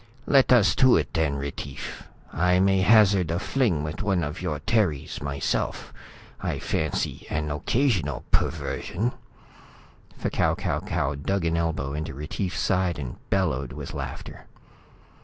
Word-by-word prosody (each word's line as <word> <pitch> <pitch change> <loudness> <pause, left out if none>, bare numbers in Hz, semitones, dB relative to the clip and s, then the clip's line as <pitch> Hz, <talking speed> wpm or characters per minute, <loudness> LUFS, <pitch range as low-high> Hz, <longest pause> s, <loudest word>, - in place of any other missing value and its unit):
"Let 135 -2 +4
us 105 -7 +6
to 130 -2 +6
it 75 -4 -2
then, 80 -3 +1
Retief. 70 -3 -6 0.3
I 90 +3 +3
may 95 0 +3
hazard 100 -4 +5
a 85 - 0
fling 100 - +1
with 75 +2 -4
one 95 -4 +1
of 75 +4 -4
your 85 -5 -2
Terries, 85 -8 0
myself. 70 -2 -2 0.5
I - - -2
fancy 80 -1 -2
an 75 0 -2
occasional 90 - 0
perversion." 115 +7 0 1.1
F'Kau - - +1
Kau - - -1
Kau 70 - -1
dug 85 +6 -1
an 85 0 +1
elbow 80 -5 -1
into 75 -1 -4
Retief's 80 +6 -3
side 90 -2 +1
and 65 -5 -6
bellowed 75 -10 0
with - - -7
laughter. - - -7
85 Hz, 140 wpm, -26 LUFS, 75-95 Hz, 1.1 s, us